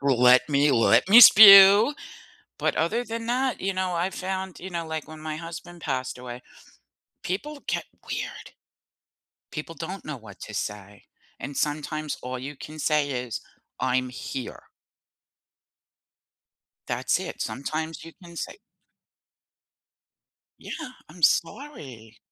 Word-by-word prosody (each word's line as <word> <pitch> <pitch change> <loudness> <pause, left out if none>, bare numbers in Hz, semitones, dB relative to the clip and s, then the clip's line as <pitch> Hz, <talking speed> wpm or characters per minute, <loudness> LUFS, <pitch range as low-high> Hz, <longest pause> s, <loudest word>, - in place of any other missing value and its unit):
Let 125 -1 +4
me 145 0 +3
let 120 +7 +3
me 225 +5 +9
spew, 200 +2 +10 0.7
but - - -1
other 220 +10 0
than 230 0 -6
that, 255 +2 -1
you 195 +1 -1
know, 185 -1 -2
I 175 +2 -1
found, 190 -1 -5
you 185 - -7
know, 170 -2 -4
like 160 -1 -5
when 155 0 -11
my 155 0 -5
husband 170 +1 -9
passed 130 -5 -4
away, 125 0 -9 0.8
people 285 +11 -5
get - - -2 0.3
weird. - - -6 1.0
People 150 +2 -7
don't 190 +3 -7
know 150 -3 -6
what 110 -4 -14
to 110 - -9
say, 105 -1 -6 0.4
and 140 +1 -7
sometimes 155 0 -3
all 125 0 -5
you 135 +4 -7
can 155 +3 -11
say 150 -1 0
is, 125 -3 -4 0.4
"I'm 130 0 0
here." 125 0 -7 2.2
That's - - 0
it, - - -7
sometimes 155 +3 -4
you 165 - -11
can 170 -1 -13
say - - -6 2.0
Yeah, 315 -5 -8 0.2
I'm 170 +3 -15
sorry. 135 - -1
155 Hz, 130 wpm, -25 LUFS, 130-185 Hz, 2.2 s, spew